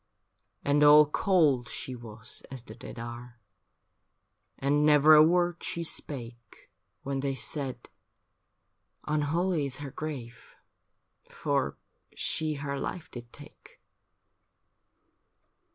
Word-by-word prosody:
And 145 +1 +3
all 150 +1 +9
cold 150 -6 +2
she 130 - -5
was 115 -1 -7
as 130 -3 -5
the - - -11
dead - - -10
are. 120 +1 -8 1.2
And 145 +2 +1
never 150 0 +6
a 150 - +9
word 175 +1 +3
she 170 - -3
spake, 120 -7 -5 0.3
When 135 0 -2
they 135 0 -1
said, 130 -1 -4 0.6
' - - -49
Unholy 155 +2 0
is 130 -2 -4
her 145 -2 -7
grave 125 -7 -7 0.7
For - - -1 0.4
she 155 -1 -1
her 140 -1 -4
life 170 +4 -5
did 120 -1 -10
take.' - - -15
140 Hz, 110 wpm, -29 LUFS, 125-155 Hz, 1.2 s, all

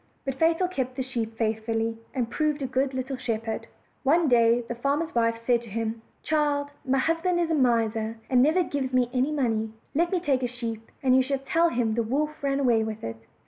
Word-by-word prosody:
But 270 - -1
Fatal 330 +6 +2
kept 260 -8 -3
the 260 - -2
sheep 230 -3 -4
faithfully, 225 0 -1 0.2
and 245 -3 0
proved 300 +2 -1
a - - 0
good 260 +1 0
little 260 +1 -3
shepherd. 225 -3 -3 0.3
One 320 +4 +3
day 235 0 +4
the - - -3
farmer's 280 +7 -1
wife 230 -1 +2
said 240 -1 +3
to 235 - -12
him: 225 +1 -3 0.2
"Child, 290 -2 +1
my 270 -1 +1
husband 330 +5 +1
is 335 -1 0
a - - +3
miser, 230 -5 +1
and 250 -1 +4
never 315 +7 +4
gives 275 -5 -2
me 250 -1 +2
any 260 +3 +1
money; 225 -6 0 0.2
let 340 +4 +1
me 370 - +2
take 280 -6 +1
a 250 - 0
sheep, 230 -2 -6
and 255 -1 +5
you 260 - +6
shall 275 +1 0
tell 335 +3 +3
him 235 -5 0
the 235 - +1
wolf 295 +7 -1
ran 275 0 +1
away 240 -5 +3
with 220 0 -5
it." 115 0 -4
255 Hz, 215 wpm, -26 LUFS, 230-290 Hz, 0.3 s, you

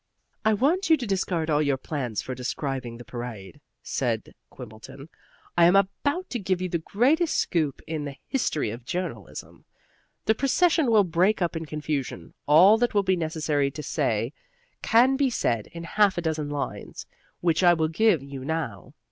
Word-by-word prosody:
"I 220 - +3
want 335 - +1
you 320 - +6
to 255 - -4
discard 180 -5 -1
all 150 0 +3
your 140 -3 +1
plans 130 -5 -4
for 130 - -5
describing 125 -1 -4
the 120 - -11
parade," 120 +1 -8 0.2
said 120 -6 -2 0.2
Quimbleton. 125 +5 -11 0.5
"I 170 - +6
am 175 +3 +5
about 285 - +1
to 245 - -2
give 185 -2 -1
you 185 0 -3
the 170 - -1
greatest 270 - +1
scoop 155 -6 -1
in 155 -2 -4
the 140 -1 -6
history 155 - -1
of 120 +2 -8
journalism. 180 +8 -6 0.6
The 220 - +4
procession 300 +4 +2
will 215 -3 +5
break 185 +4 +2
up 175 -2 -1
in 165 -1 -4
confusion. 150 - -4
All 185 +9 +7
that 240 -2 0
will 205 - +4
be 190 -1 +2
necessary 155 -4 0
to 150 +2 -8
say - - -1 0.5
can 255 +4 +4
be 275 -1 +2
said 115 - -1
in 170 0 -9
half 200 +3 +2
a - - 0
dozen 155 -2 -2
lines, 145 -1 -5 0.4
which 170 -1 +2
I 175 -1 +6
will 160 -1 +1
give 170 -2 +2
you 140 -1 -8
now. 140 - -4
165 Hz, 175 wpm, -26 LUFS, 140-205 Hz, 0.6 s, All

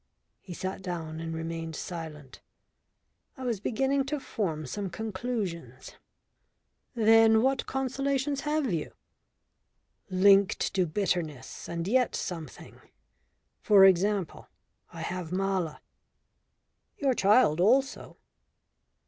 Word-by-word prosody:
He 180 - -9
sat 190 +2 -5
down 165 -4 -5
and 165 0 -5
remained 165 0 -5
silent. 155 -7 -8 1.0
I 260 - -8
was 235 -5 -1
beginning 270 +5 0
to 295 +2 -3
form 165 - -3
some 200 +7 -4
conclusions. 185 - -5 1.0
"Then 225 0 +5
what 265 0 +1
consolations 275 +1 -1
have 295 - -1
you?" 160 -3 -3 1.2
"Linked 195 +1 +4
to 185 -2 +1
bitterness 160 -5 -3
and 170 +1 -3
yet 250 +3 +2
something. 165 -6 -7 0.8
For 200 -2 +7
example 195 -1 +1 0.4
I - - -8
have 180 -2 -4
Mala." 185 -4 -1 1.2
"Your 275 -2 +1
child 200 -7 +4
also." 265 +8 +1
195 Hz, 100 wpm, -28 LUFS, 165-245 Hz, 1.2 s, For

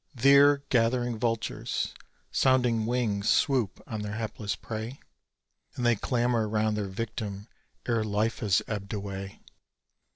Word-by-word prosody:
There 140 +3 +6
gathering 120 -1 +1
vultures' 115 -1 -2 0.4
sounding 125 -4 +3
wings 110 -4 0
swoop 130 -9 +2
on 110 -1 -5
their 105 0 -4
hapless 105 -2 -3
prey; 115 +4 -6 0.8
And 125 - -2
they 120 -1 +5
clamour 120 -1 0
round 110 0 +1
their 105 -2 -2
victim 105 0 -5 0.4
ere 115 -2 +1
life 110 +2 0
has 100 -4 +2
ebbed 105 -1 -4
away. 100 -1 -6
110 Hz, 125 wpm, -28 LUFS, 105-120 Hz, 0.8 s, There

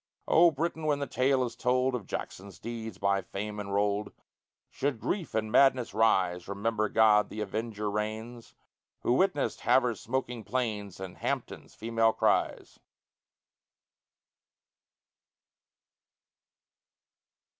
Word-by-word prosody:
O 170 +1 +6
Britain! 160 +1 -3
when 145 -1 +2
the 140 - -2
tale 130 0 +2
is 120 -2 -4
told 125 +1 +1
Of 115 -6 -4
Jackson's 95 -1 -6
deeds 115 -4 -6
by 100 0 +1
fame 105 +3 -5
enrolled, 100 +1 -1 0.6
Should 135 -4 -2
grief 180 - -3
and 110 -1 -1
madness 130 -3 +4
rise, 95 -5 +2
Remember 105 +2 -1
God, 105 -1 +4
the 105 - -7
avenger, 105 +1 -3
reigns, 110 +3 -4 0.5
Who 120 - +2
witnessed 165 -1 +1
Havre's 125 -5 +2
smoking 125 -1 -3
plains, 105 -7 -3
And 95 -2 -7
Hampton's - - -4
female 115 0 +1
cries. - - 0
110 Hz, 110 wpm, -29 LUFS, 105-125 Hz, 0.6 s, O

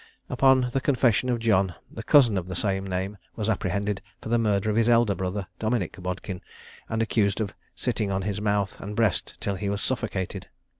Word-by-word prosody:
Upon 130 -2 +4
the 135 - +1
confession 125 -3 +2
of 120 - +2
John, 100 -6 +2 0.2
the 115 - -6
cousin 125 -4 +5
of 90 -2 -2
the 90 - -5
same 95 0 -1
name 95 +2 -3 0.2
was 110 -2 -2
apprehended 100 -1 -1 0.2
for - - -7
the 120 0 +3
murder 105 -1 +1
of - - -1
his 115 +1 +3
elder 115 -3 +4
brother, 95 +1 -3
Dominick 110 -3 -1
Bodkin, 90 0 -4 0.5
and 110 0 +1
accused 105 -3 +1
of 100 -3 -2 0.2
sitting 105 - -1
on 95 0 -1
his 105 0 -2
mouth 100 -2 0
and 105 +1 -6
breast 110 -5 +1
until 100 - -2
he 100 +2 -2
was 100 0 -1
suffocated. 110 -8 -2
105 Hz, 195 wpm, -26 LUFS, 95-115 Hz, 0.5 s, cousin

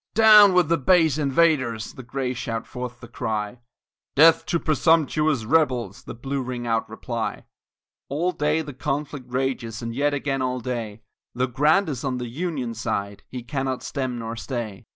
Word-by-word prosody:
"Down 215 -3 +8
with 180 -3 +4
the 165 +1 +2
base 160 -1 +3
invaders," 135 -6 +1
the - - -9
Gray 125 +1 -3
shout 115 -2 -4
forth 125 -1 -7
the 120 - -9
cry, 110 0 -3 0.6
"Death 160 +3 +6
to 170 - +1
presumptuous 155 -5 +2
rebels," 120 - +1
the - - -7
Blue 135 +3 -3
ring 125 -1 -5
out 115 -1 0
reply; - - -4 0.6
All 165 +6 0
day 150 0 0
the 145 -2 -8
conflict 140 -1 -4
rages 125 -3 -2
and 115 0 -4
yet 145 +3 +1
again 135 -1 -2
all 125 0 -1
day, 115 -3 -5 0.3
Though 125 +1 +1
Grant 150 +10 +2
is 135 -6 -4
on 130 -2 -1
the 120 -1 -5
Union 135 -4 -3
side 100 -2 -3
he 125 -2 -6
cannot 130 0 -3
stem 130 -3 -3
nor 115 0 -5
stay. 115 -5 -5
130 Hz, 170 wpm, -24 LUFS, 120-150 Hz, 0.6 s, Down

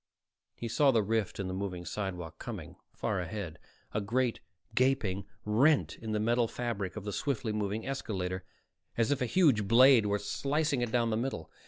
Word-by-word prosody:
He 120 - -5
saw 140 +5 +3
the 115 -5 +4
rift 110 0 -1
in 95 - -2
the 95 - -3
moving 95 -2 -4
sidewalk 90 -2 -4
coming, - - -7 0.2
far 100 -3 -2
ahead, 90 -2 -5 0.3
a 105 - 0
great, 120 +4 0 0.3
gaping 115 -7 +1 0.2
rent 130 +8 +3
in 110 -1 -6
the 105 - 0
metal 120 +2 +2
fabric 110 -6 -3
of 110 - -5
the 105 -1 -4
swiftly 115 -4 -1
moving 105 +1 -2
escalator, 95 -9 -3 0.5
as 115 +3 +2
if 140 - +1
a 125 - +1
huge 130 - +3
blade 120 -1 +7
were 100 0 +2
slicing 140 +6 0
it 120 -2 -1
down 115 -1 +2
the 110 - +1
middle. 120 -9 -3
110 Hz, 180 wpm, -31 LUFS, 100-125 Hz, 0.5 s, blade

